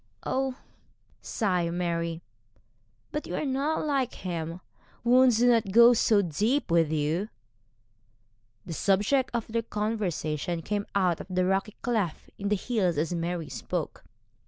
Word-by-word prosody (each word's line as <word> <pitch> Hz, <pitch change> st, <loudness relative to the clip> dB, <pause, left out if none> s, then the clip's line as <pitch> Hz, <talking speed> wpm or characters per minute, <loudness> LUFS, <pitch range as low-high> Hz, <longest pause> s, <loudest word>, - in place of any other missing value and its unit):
'Oh!' 265 Hz, -1 st, -1 dB, 0.7 s
sighed 180 Hz, -6 st, -1 dB
Mary, 170 Hz, -1 st, -2 dB, 0.9 s
'but 300 Hz, -, -4 dB
you -, -, -4 dB
are -, -, -2 dB
not 280 Hz, +4 st, 0 dB
like 275 Hz, -4 st, 0 dB
him; 170 Hz, -1 st, -4 dB, 0.4 s
wounds 250 Hz, -1 st, +5 dB
do 245 Hz, +2 st, +4 dB
not 230 Hz, -5 st, +3 dB
go 235 Hz, +3 st, +8 dB
so 215 Hz, -3 st, +3 dB
deep 210 Hz, -, 0 dB
with 165 Hz, -2 st, +3 dB
you.' 160 Hz, +7 st, 0 dB, 1.4 s
The 165 Hz, -, -5 dB
subject 205 Hz, -, +2 dB
of 235 Hz, -2 st, -2 dB
their 230 Hz, +1 st, -1 dB
conversation 180 Hz, -7 st, -2 dB
came 205 Hz, +2 st, -2 dB
out 180 Hz, -4 st, +2 dB
of -, -, -10 dB
the 185 Hz, 0 st, +1 dB
rocky 195 Hz, +2 st, 0 dB
cleft 215 Hz, -9 st, -2 dB
in 200 Hz, 0 st, -2 dB
the 210 Hz, -, +3 dB
hills 190 Hz, -6 st, 0 dB
as 160 Hz, +4 st, 0 dB
Mary 170 Hz, -1 st, -2 dB
spoke. 115 Hz, -7 st, -4 dB
195 Hz, 140 wpm, -28 LUFS, 170-235 Hz, 1.4 s, go